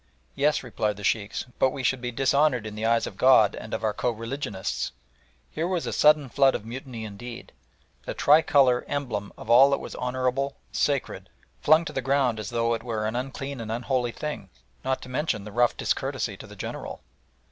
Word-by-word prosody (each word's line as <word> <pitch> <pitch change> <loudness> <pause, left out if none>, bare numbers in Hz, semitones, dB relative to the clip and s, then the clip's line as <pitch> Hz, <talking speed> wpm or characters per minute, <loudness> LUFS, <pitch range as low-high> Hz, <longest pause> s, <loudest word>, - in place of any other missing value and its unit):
"Yes," 145 +1 +1
replied 105 -4 -2
the 105 - -9
Sheikhs, 105 0 -1
"but 130 - +4
we 130 0 -6
should 130 0 +1
be 125 -1 -3
dishonoured 135 -1 +2
in 110 - -6
the 110 +1 -2
eyes 115 0 +2
of - - -8
God 125 -6 +6
and 110 - -8
of - - -3
our 110 -1 +1
co 125 - 0
religionists!" 115 -3 -4 0.6
Here 165 - -2
was 180 -2 -1
a - - -3
sudden 150 -2 +5
flood 135 +2 +3
of 105 - -5
mutiny 120 -1 -7
indeed! 115 +3 -9 0.5
The - - -4
tricolour, 140 -4 +4
emblem 120 -8 -3
of - - -10
all 130 +4 +8
that 140 - +1
was - - -8
honourable, 130 +2 -1 0.2
sacred, 140 -3 -1 0.3
flung 155 +2 +5
to - - -6
the 130 - -1
ground 130 -3 +1
as 105 - -5
though 115 0 +1
it 115 - -2
were 110 -3 -3
an 110 +2 -2
unclean 135 +1 -4
and 110 -1 -5
unholy 120 +1 -1
thing, 150 -8 -6 0.3
not 130 0 -1
to - - -9
mention 125 -6 -1
the 105 - -9
rough 120 +2 +2
discourtesy - - -1
to - - -11
the - - -12
General. - - -6
125 Hz, 200 wpm, -26 LUFS, 115-135 Hz, 0.6 s, all